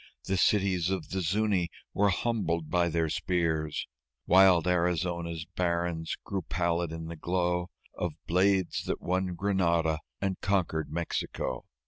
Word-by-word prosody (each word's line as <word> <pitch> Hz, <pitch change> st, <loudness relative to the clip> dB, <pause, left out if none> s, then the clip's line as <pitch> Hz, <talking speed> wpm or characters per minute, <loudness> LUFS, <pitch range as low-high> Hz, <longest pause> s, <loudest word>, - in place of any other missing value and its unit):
The 95 Hz, -, -1 dB
cities 95 Hz, -2 st, +2 dB
of 95 Hz, -5 st, -2 dB
the 95 Hz, -, -2 dB
Zuñi 95 Hz, 0 st, +1 dB, 0.3 s
were 100 Hz, +2 st, +3 dB
humbled 90 Hz, -6 st, -1 dB
by 85 Hz, -1 st, +3 dB
their 80 Hz, 0 st, +1 dB
spears. 80 Hz, -2 st, -1 dB, 0.4 s
Wild 90 Hz, -2 st, +6 dB
Arizona's 85 Hz, -1 st, 0 dB
barrens 85 Hz, -2 st, -1 dB
grew 95 Hz, -1 st, -3 dB
pallid 85 Hz, -1 st, -1 dB
in 80 Hz, 0 st, -5 dB
the 85 Hz, +1 st, -6 dB
glow 90 Hz, +2 st, 0 dB, 0.2 s
Of 85 Hz, -3 st, -3 dB
blades 95 Hz, +1 st, +2 dB
that -, -, -2 dB
won 90 Hz, 0 st, -1 dB
Granada 85 Hz, -4 st, +1 dB, 0.2 s
and 95 Hz, -1 st, -2 dB
conquered 90 Hz, -6 st, 0 dB
Mexico. 80 Hz, -6 st, -3 dB
90 Hz, 130 wpm, -29 LUFS, 85-95 Hz, 0.4 s, Wild